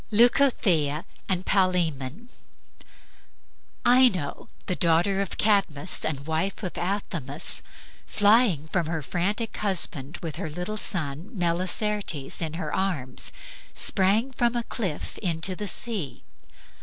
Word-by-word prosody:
LEUCOTHEA 205 Hz, -, +3 dB, 0.2 s
AND 185 Hz, -1 st, 0 dB
PALAEMON 180 Hz, -, 0 dB, 1.6 s
Ino, 240 Hz, -, +3 dB, 0.2 s
the 185 Hz, -, -1 dB
daughter 175 Hz, +4 st, +2 dB
of 200 Hz, -, -4 dB
Cadmus 190 Hz, -6 st, +2 dB
and 140 Hz, -3 st, -2 dB
wife 165 Hz, +7 st, -2 dB
of 185 Hz, -, -4 dB
Athamas, 170 Hz, -7 st, -1 dB, 0.5 s
flying 205 Hz, -, +4 dB
from 170 Hz, -3 st, 0 dB
her 160 Hz, -2 st, -3 dB
frantic 205 Hz, -, -2 dB
husband 170 Hz, -7 st, 0 dB
with 160 Hz, -3 st, -4 dB
her 160 Hz, -, -4 dB
little 180 Hz, +7 st, -4 dB
son 165 Hz, -3 st, -2 dB
Melicertes 180 Hz, -2 st, -1 dB
in 160 Hz, -2 st, -2 dB
her 175 Hz, +4 st, -4 dB
arms, 155 Hz, -10 st, -1 dB, 0.4 s
sprang 210 Hz, +7 st, +3 dB
from 240 Hz, -1 st, 0 dB
a 240 Hz, -, 0 dB
cliff 190 Hz, -10 st, -4 dB
into 175 Hz, +1 st, 0 dB
the 210 Hz, +2 st, -5 dB
sea. 200 Hz, -, -2 dB
180 Hz, 115 wpm, -26 LUFS, 160-210 Hz, 1.6 s, flying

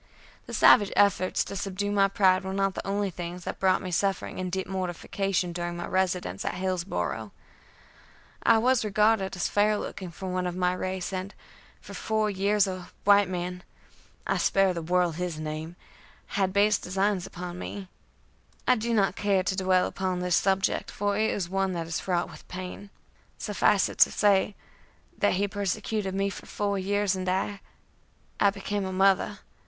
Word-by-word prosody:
The -, -, -8 dB
savage 205 Hz, -1 st, +6 dB
efforts 190 Hz, -2 st, +3 dB
to -, -, -7 dB
subdue 200 Hz, +1 st, -2 dB
my 200 Hz, -1 st, +4 dB
pride 190 Hz, -1 st, +3 dB
were 190 Hz, 0 st, -4 dB
not 195 Hz, -1 st, +1 dB
the -, -, -6 dB
only 200 Hz, 0 st, 0 dB
things 175 Hz, +1 st, -6 dB
that -, -, -5 dB
brought 190 Hz, 0 st, +2 dB
me 185 Hz, -, -4 dB
suffering 195 Hz, +2 st, -1 dB
and 185 Hz, -1 st, -3 dB
deep 190 Hz, +1 st, -2 dB
mortification 185 Hz, 0 st, -2 dB
during 175 Hz, 0 st, -4 dB
my 175 Hz, -, -4 dB
residence 180 Hz, -, -1 dB
at -, -, -2 dB
Hillsboro'. 170 Hz, -, -2 dB, 1.1 s
I 230 Hz, -, +5 dB
was 250 Hz, +2 st, +3 dB
regarded 210 Hz, -1 st, +2 dB
as 180 Hz, -, -1 dB
fair 210 Hz, +1 st, +2 dB
looking 190 Hz, -2 st, -6 dB
for 180 Hz, +3 st, -9 dB
one 185 Hz, 0 st, -1 dB
of 175 Hz, -, -4 dB
my 180 Hz, 0 st, +1 dB
race, 185 Hz, 0 st, -3 dB
and 185 Hz, +2 st, -4 dB, 0.5 s
for -, -, -11 dB
four 215 Hz, -1 st, 0 dB
years 200 Hz, +1 st, +2 dB
a 185 Hz, -2 st, -6 dB
white 200 Hz, -1 st, +5 dB
man 180 Hz, 0 st, -4 dB, 0.6 s
I -, -, 0 dB
spare 195 Hz, -1 st, +3 dB
the 170 Hz, -, -4 dB
world 175 Hz, 0 st, +1 dB
his 175 Hz, -3 st, -3 dB
name 155 Hz, +2 st, -5 dB, 0.5 s
had 190 Hz, -2 st, 0 dB
base 205 Hz, +1 st, +3 dB
designs 190 Hz, 0 st, -1 dB
upon 175 Hz, 0 st, -7 dB
me. 195 Hz, 0 st, -6 dB, 0.8 s
I 255 Hz, -, +7 dB
do 230 Hz, +1 st, -1 dB
not 195 Hz, -3 st, +2 dB
care 195 Hz, -2 st, +1 dB
to 190 Hz, -, -1 dB
dwell 185 Hz, -1 st, +2 dB
upon 185 Hz, -1 st, -2 dB
this 180 Hz, -1 st, +1 dB
subject, 195 Hz, 0 st, +1 dB
for 205 Hz, 0 st, -1 dB
it 220 Hz, +1 st, +2 dB
is 185 Hz, -4 st, -2 dB
one 195 Hz, +1 st, 0 dB
that 170 Hz, -1 st, -3 dB
is 165 Hz, -, -3 dB
fraught 175 Hz, -2 st, -1 dB
with -, -, -14 dB
pain. 185 Hz, +2 st, -7 dB, 0.5 s
Suffice -, -, +2 dB
it -, -, -9 dB
to -, -, +7 dB
say, 200 Hz, -1 st, +2 dB, 0.6 s
that -, -, +3 dB
he 200 Hz, +2 st, +1 dB
persecuted 200 Hz, 0 st, -2 dB
me 195 Hz, 0 st, 0 dB
for -, -, -10 dB
four 200 Hz, -1 st, -1 dB
years, 200 Hz, 0 st, +1 dB
and 185 Hz, 0 st, -2 dB
I 195 Hz, +2 st, -1 dB, 0.8 s
I 200 Hz, -, +5 dB
became 200 Hz, 0 st, -3 dB
a 190 Hz, -, -3 dB
mother. 190 Hz, +1 st, +2 dB
190 Hz, 180 wpm, -27 LUFS, 180-200 Hz, 1.1 s, I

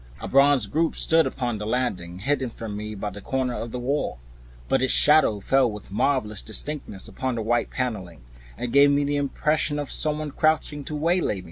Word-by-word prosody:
A -, -, -6 dB
bronze 140 Hz, -3 st, +4 dB
group 160 Hz, +11 st, 0 dB
stood 165 Hz, -3 st, +3 dB
upon 120 Hz, -4 st, -3 dB
the 105 Hz, -, -5 dB
landing 95 Hz, -8 st, -2 dB
hidden 130 Hz, +5 st, -1 dB
from 110 Hz, -2 st, -7 dB
me 105 Hz, +1 st, -6 dB
by 105 Hz, +1 st, -4 dB
a 100 Hz, -, -9 dB
corner 130 Hz, +2 st, -2 dB
of 115 Hz, -1 st, -5 dB
the -, -, -4 dB
wall; 125 Hz, -, -2 dB, 0.5 s
but -, -, +2 dB
its 130 Hz, -, +3 dB
shadow 150 Hz, -8 st, +5 dB
fell 130 Hz, +4 st, +2 dB
with 105 Hz, -2 st, -10 dB
marvelous 110 Hz, -2 st, 0 dB
distinctness 110 Hz, -3 st, -4 dB
upon 130 Hz, -2 st, -3 dB
the 115 Hz, -, -3 dB
white 120 Hz, +2 st, 0 dB
paneling, 95 Hz, -, -4 dB, 0.3 s
and 120 Hz, -1 st, -4 dB
gave 140 Hz, +1 st, +7 dB
me 140 Hz, 0 st, +2 dB
the 145 Hz, 0 st, 0 dB
impression 145 Hz, +1 st, 0 dB
of 145 Hz, -2 st, -4 dB
some 150 Hz, -1 st, 0 dB
one 155 Hz, -1 st, -5 dB
crouching 155 Hz, -1 st, 0 dB
to 155 Hz, -, -5 dB
waylay 170 Hz, -, +1 dB
me. -, -, -6 dB
130 Hz, 205 wpm, -24 LUFS, 105-145 Hz, 0.5 s, gave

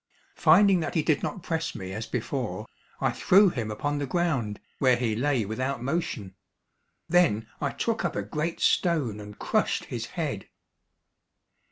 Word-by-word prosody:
Finding 190 Hz, +3 st, +5 dB
that 160 Hz, -, -3 dB
he 160 Hz, -, +2 dB
did 150 Hz, -1 st, +2 dB
not 190 Hz, -, -4 dB
press 160 Hz, -2 st, -2 dB
me 95 Hz, -1 st, -6 dB
as 110 Hz, +2 st, -5 dB
before, -, -, -3 dB, 0.3 s
I -, -, +1 dB
threw 195 Hz, +2 st, +5 dB
him 115 Hz, -9 st, -3 dB
upon 145 Hz, +7 st, -2 dB
the 140 Hz, -, -2 dB
ground, 135 Hz, -, -1 dB, 0.2 s
where 130 Hz, -2 st, +5 dB
he 120 Hz, -3 st, -1 dB
lay 130 Hz, -1 st, +1 dB
without 130 Hz, +4 st, -3 dB
motion; 135 Hz, -, -2 dB, 0.7 s
then 160 Hz, -11 st, +3 dB
I 140 Hz, -, +1 dB
took 230 Hz, +9 st, -2 dB
up 175 Hz, -, -1 dB
a 105 Hz, -, -1 dB
great 155 Hz, +11 st, -3 dB
stone 145 Hz, -, +2 dB
and 105 Hz, 0 st, -10 dB
crushed -, -, 0 dB
his -, -, -3 dB
head. -, -, -3 dB
145 Hz, 160 wpm, -27 LUFS, 110-170 Hz, 0.7 s, Finding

